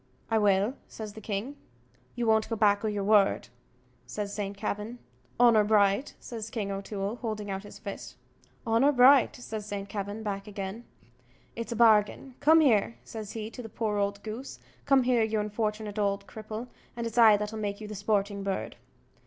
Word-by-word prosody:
"I 220 - +4
will," 205 +2 +3
says 215 -2 -8
the 220 - -10
king. 215 +7 -4 0.6
"You 240 -1 -1
won't 220 -1 +3
go 225 - -1
back 205 -1 +3
o' - - 0
your 205 -2 -2
word?" 200 - +3 0.6
says 205 -1 -4
St. 200 -1 -4
Kavin. 210 +3 -4 0.4
"Honour 235 -3 +6
bright!" 205 +3 +2
says 225 -2 -7
King 210 -3 -3
O'Toole, 195 +2 -4
holding 215 -4 -4
out 190 0 -3
his 205 - -12
fist. 200 - -8 0.5
"Honour 235 +6 +3
bright!" 260 +1 +6
says 220 -4 -6
St. 200 -1 -5
Kavin, 205 +1 -5
back 200 -1 -4
again, 200 +3 -6 0.7
"it's 230 +1 -5
a - - -2
bargain. 220 +3 +3
Come 320 +3 +6
here!" 230 -5 +3
says 215 -2 -7
he 220 -1 -5
to 250 - -8
the 225 - -8
poor 215 -1 -2
old 200 0 -1
goose 225 +5 -7 0.3
"come 275 -2 +5
here, 245 -2 +3
you 220 -1 +1
unfortunate 210 0 -2
ould 200 -1 0
cripple, 215 +2 -7 0.3
and 235 - -3
it's 230 +1 -1
I 220 -3 +8
that'll 210 +1 -4
make 205 -1 -3
you 215 - -7
the 210 - -7
sporting 205 0 -1
bird." 195 -1 -3
215 Hz, 180 wpm, -28 LUFS, 205-230 Hz, 0.7 s, I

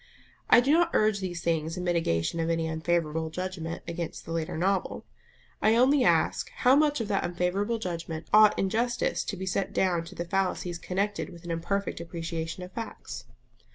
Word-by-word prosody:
I - - +8
do 270 +3 +2
not 345 +1 +4
urge 215 -1 +3
these 175 -3 -4
things 165 0 -1
in 180 - -3
mitigation 165 - 0
of 165 0 0
any 165 -1 0
unfavourable 160 0 -1
judgment 175 -1 -5
against 170 -1 -5
the 165 - -7
later 165 -1 -2
novel. 190 +3 0 0.6
I 220 +1 +4
only 260 +3 +5
ask - - +2
How 255 +1 +5
much 295 -3 +3
of 225 - -3
that 195 - +1
unfavourable 185 +6 0
judgment 170 -5 -5
ought 215 0 +7
in 195 - +1
justice 240 +2 0
to 200 - -4
be 190 - -4
set 190 +1 -1
down 175 -3 +1
to - - -11
the 170 - -4
fallacies 180 -1 -1
connected 200 +4 -2
with 170 -1 -13
an 175 - -5
imperfect 195 +4 -2
appreciation 165 +1 -5
of 180 - -9
facts? 230 +2 -7
180 Hz, 185 wpm, -28 LUFS, 165-205 Hz, 0.6 s, I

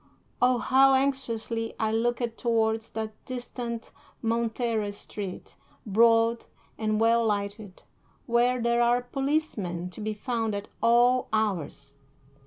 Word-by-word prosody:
Oh, 250 0 +4
how 265 +2 +5
anxiously 230 -4 -1
I 220 -1 +1
looked 235 +1 0
towards 225 -2 0
that 220 -1 -4
distant 240 -2 -6 0.3
Montera 230 -2 0
street, 200 -2 -8 0.3
broad 230 +2 +3 0.3
and 215 -1 -1
well 230 +1 +4
lighted, 205 -2 -3 0.4
where 245 +1 +2
there 235 0 +2
are 240 +1 +3
policemen 245 - -2
to 215 - -10
be 215 0 -3
found 225 -1 -2
at 200 0 -6
all 240 +2 +4
hours! 180 -10 -2
230 Hz, 115 wpm, -27 LUFS, 215-240 Hz, 0.4 s, how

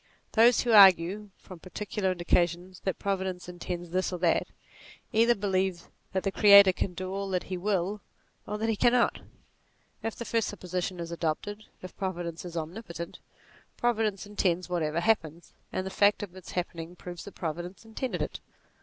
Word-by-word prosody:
Those 235 +2 +5
who 240 - 0
argue, 195 0 +6
from 185 -3 -12
particular 190 +2 -3
indications, 175 0 0
that 190 - -1
Providence 190 -3 -2
intends 175 -1 -6
this 185 +1 0
or 180 - -3
that, 175 -1 +2 0.7
either 230 +2 +5
believe 190 -3 -1 0.2
that 190 - 0
the 195 - 0
Creator 200 -2 +8
can 180 0 -3
do 185 +1 -4
all 195 0 -3
that 180 -1 0
he - - 0
will 195 +1 -1 0.5
or 210 - -3
that 220 +1 -1
he 225 - +1
cannot. 240 +3 +3 0.8
If 225 - -3
the 235 - -6
first 225 -2 0
supposition 180 -2 -4
is 170 0 -5
adopted 175 +6 -3 0.2
if 185 - -9
Providence 175 -3 -4
is 170 -1 -6
omnipotent, 170 +1 -6 0.6
Providence 220 -4 0
intends 185 -4 0
whatever 165 -2 0
happens, 170 -6 0 0.2
and 185 - -2
the 190 - -4
fact 205 +1 +3
of 185 -3 -8
its 185 -2 -10
happening 170 -1 -4
proves 175 -1 -8
that 200 - -10
Providence 175 +5 -5
intended 220 -6 -3
it. - - -5
185 Hz, 165 wpm, -28 LUFS, 175-205 Hz, 0.8 s, Creator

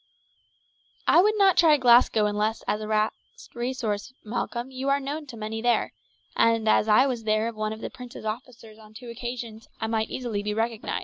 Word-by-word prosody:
"I 345 - +6
would 425 +3 +2
not 390 -3 +4
try 315 -3 +6
Glasgow 240 -4 +5
unless 210 +2 -1
as 210 - -1
a 215 - -5
last 215 0 +1 0.4
resource, 240 -3 -3
Malcolm; 240 +3 -4
you 265 +1 -3
are 280 0 +3
known 290 +2 -5
to 240 -3 -10
many 220 +1 -4
there, 240 0 +1 0.4
and 230 -1 +2
as 215 - +4
I 220 +5 +5
was 250 -4 -2
there 215 +1 +1
as - - -8
one 215 0 -3
of 220 0 -7
the - - -5
prince's 250 -3 -10
officers 225 -1 -7
on 215 0 -17
two 240 +1 -10
occasions 235 -2 -7
I 225 - -2
might 220 0 -1
easily 235 -5 -3
be 210 0 -3
recognized. 225 0 -2
230 Hz, 195 wpm, -26 LUFS, 215-255 Hz, 0.4 s, I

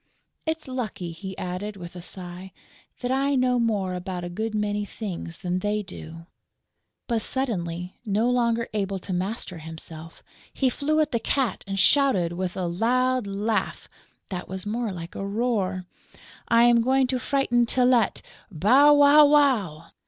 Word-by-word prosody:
It's 320 -2 -2
lucky," 220 -9 -4
he 190 +3 -8
added, 190 +3 -4
with 175 -1 -9
a 175 - -7
sigh, 180 +1 -8 0.5
"that 250 0 -1
I 275 +1 +1
know 250 -1 +2
more 205 -5 0
about 180 0 -5
a 175 - -4
good 220 +5 -3
many 210 0 -1
things 190 -5 -6
than 180 -1 -2
they 210 +2 -1
do!" 165 -3 -10 0.8
But 230 -2 0
suddenly, 180 -9 -3
no 215 +1 +1
longer 235 -2 +1
able 195 -2 -1
to 185 0 -6
master 185 -1 -3
himself, 160 0 -9 0.3
he 265 - +1
flew 305 +4 +1
at 305 - 0
the 235 - 0
Cat 255 -4 -1
and 195 0 -2
shouted, 195 - +4
with 180 +1 -3
a 185 - -1
loud 245 +6 +1
laugh 205 +3 -2 0.4
that 180 -2 -5
was 190 +1 -6
more 225 +1 -2
like 170 -2 -7
a - - -5
roar: 200 -3 -1 0.6
"I'm 235 0 +5
going 260 +2 +3
to 255 0 -1
frighten 245 -3 +1
Tylette! 245 -3 +2 0.3
Bow, 255 - +5
wow, 290 +1 +7
wow!" 235 - +2
210 Hz, 155 wpm, -25 LUFS, 180-250 Hz, 0.8 s, wow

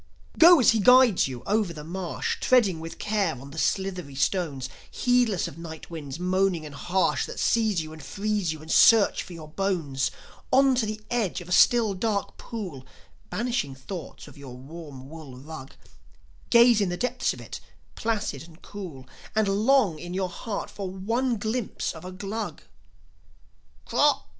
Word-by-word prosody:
Go 340 0 +9
as 250 - +6
he 225 - +1
guides 250 - +6
you, 125 -2 -7
over 205 -4 +1
the 150 -2 -8
marsh, 175 +2 -3
Treading 210 -10 +3
with 165 +1 -8
care 200 - -1
on 140 +2 -11
the 160 - -6
slithery 185 -8 -1
stones, 140 -3 -1 0.2
Heedless 245 -6 +1
of - - -10
night 160 -1 -9
winds 150 -4 -6
moaning 185 -2 +1
and 150 - -9
harsh 180 +6 0
That - - -7
seize 215 -7 +2
you 155 0 -9
and 160 - -11
freeze 200 +3 -2
you 155 -1 -7
and 160 - -7
search 225 -3 +6
for 180 - -10
your 160 -2 -9
bones. 155 -7 -1 0.4
On 270 0 +5
to 245 -3 +1
the 215 0 -5
edge 225 -8 0
of 175 - -10
a - - -9
still, 225 +2 +5
dark 200 +1 -2
pool, 185 - -7 0.5
Banishing 205 - -2
thoughts 150 +6 -8
of 145 -1 -14
your 130 -3 -9
warm 140 -1 -10
wool 150 -4 -10
rug; 140 0 -10 0.7
Gaze 235 -2 +6
in 195 - +1
the 175 - -3
depths 250 +3 0
of - - -8
it, - - -8 0.3
placid 215 - -2
and 165 +1 -14
cool, 170 -11 -9 0.3
And 215 -1 +2
long 205 - +3
in 175 +2 -6
your 190 -1 -1
heart 205 +4 -5
for 195 -2 -5
one 230 +6 -1
glimpse 220 +2 -3
of 160 - -11
a 185 - -7
Glug. 200 +3 -5 1.2
"Krock!" - - +3
185 Hz, 170 wpm, -26 LUFS, 155-220 Hz, 1.2 s, Go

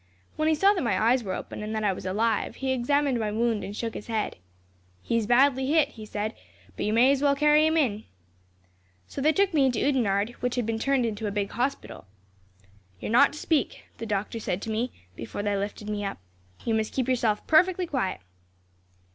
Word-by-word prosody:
When 310 0 0
he 315 - +3
saw 395 +6 +4
that 370 - -2
my 235 - 0
eyes 235 +3 +3
were 190 -3 -3
open, - - -7
and 215 +1 -4
that 215 - -2
I 200 -2 +2
was 185 0 -7
alive, 215 +3 0
he 265 -1 -2
examined 260 +1 +1
my 215 -2 -1
wound 225 0 0
and 200 - -6
shook 230 -1 -3
his - - -8
head. 220 -2 -2 0.7
"'He - - -1
is 225 -2 0
badly 265 +2 +4
hit,' 300 0 +3
he 220 -6 -11
said, 210 +1 -3 0.4
'but - - -2
you - - +1
may 240 +5 +5
as 280 -1 +1
well 285 -1 +3
carry 300 +2 +4
him 320 +1 +1
in.' 220 -8 0 1.0
"So 275 - -6
they 305 +3 +4
took 390 +3 +1
me 285 -4 +4
into 245 -4 0
Oudenarde, 220 -6 +1
which 250 0 -1
had 245 -3 -1
been 225 0 -2
turned 270 0 +1
into 220 -1 -3
a - - -2
big 200 -1 -2
hospital. 255 - -3 0.9
"'You - - -5
are - - -3
not 280 +5 +5
to 300 - -8
speak,' 315 -4 -1 0.2
the 230 - -5
doctor 210 +2 -2
said 185 -4 -2
to 225 - -4
me, 235 +3 -1 0.2
before 115 - -6
they 205 -1 0
lifted 205 +1 -4
me 210 -1 -3
up. 195 - -4 0.5
'You 230 - +1
must 220 -1 -1
keep 255 -2 -1
yourself 230 -5 0
perfectly 360 +3 +4
quiet.' 255 - -2
235 Hz, 220 wpm, -26 LUFS, 210-280 Hz, 1.0 s, may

